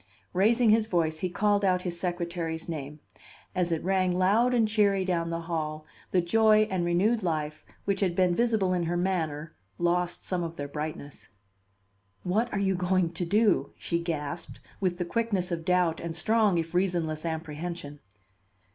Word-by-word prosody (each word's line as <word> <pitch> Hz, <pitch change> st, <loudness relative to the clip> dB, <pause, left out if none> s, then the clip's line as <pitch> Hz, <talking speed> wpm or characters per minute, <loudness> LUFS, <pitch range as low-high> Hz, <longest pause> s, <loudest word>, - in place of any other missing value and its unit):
Raising 220 Hz, +5 st, +4 dB
his 220 Hz, 0 st, +3 dB
voice, 160 Hz, -5 st, 0 dB
he 185 Hz, -, -1 dB
called 205 Hz, +3 st, +1 dB
out 180 Hz, -2 st, +2 dB
his 175 Hz, -2 st, -4 dB
secretary's 170 Hz, -2 st, -3 dB
name. 150 Hz, -2 st, -6 dB, 0.5 s
As 180 Hz, -2 st, 0 dB
it 165 Hz, -, -1 dB
rang 185 Hz, 0 st, +2 dB
loud 210 Hz, +7 st, +3 dB
and 235 Hz, -3 st, +3 dB
cheery 200 Hz, -3 st, +2 dB
down 170 Hz, -2 st, 0 dB
the 165 Hz, 0 st, -3 dB
hall, 155 Hz, -2 st, -3 dB, 0.2 s
the 180 Hz, -, +2 dB
joy 215 Hz, +4 st, +4 dB
and 185 Hz, -2 st, 0 dB
renewed 195 Hz, +7 st, +2 dB
life 155 Hz, -4 st, -2 dB, 0.2 s
which 200 Hz, -1 st, 0 dB
had 185 Hz, -4 st, +1 dB
been 180 Hz, -1 st, +3 dB
visible 220 Hz, -3 st, +2 dB
in 180 Hz, -, 0 dB
her 175 Hz, +1 st, -1 dB
manner 165 Hz, -4 st, -2 dB, 0.2 s
lost 175 Hz, 0 st, 0 dB
some 185 Hz, -2 st, 0 dB
of 165 Hz, -1 st, -4 dB
their 145 Hz, -2 st, -5 dB
brightness. 150 Hz, -1 st, -7 dB, 0.9 s
"What 220 Hz, +6 st, 0 dB
are -, -, -2 dB
you 195 Hz, -1 st, +2 dB
going 180 Hz, -1 st, +1 dB
to 175 Hz, +1 st, -2 dB
do?" 205 Hz, +3 st, +2 dB
she 170 Hz, -, -1 dB
gasped, 165 Hz, -1 st, -4 dB, 0.2 s
with 180 Hz, -3 st, 0 dB
the 175 Hz, -, -2 dB
quickness 200 Hz, -3 st, -1 dB
of 165 Hz, -1 st, -3 dB
doubt 180 Hz, -3 st, +2 dB
and 165 Hz, -1 st, -5 dB
strong 215 Hz, +1 st, +2 dB
if 165 Hz, 0 st, -2 dB
reasonless 175 Hz, -4 st, 0 dB
apprehension. 160 Hz, -2 st, -5 dB
175 Hz, 170 wpm, -28 LUFS, 165-195 Hz, 0.9 s, Raising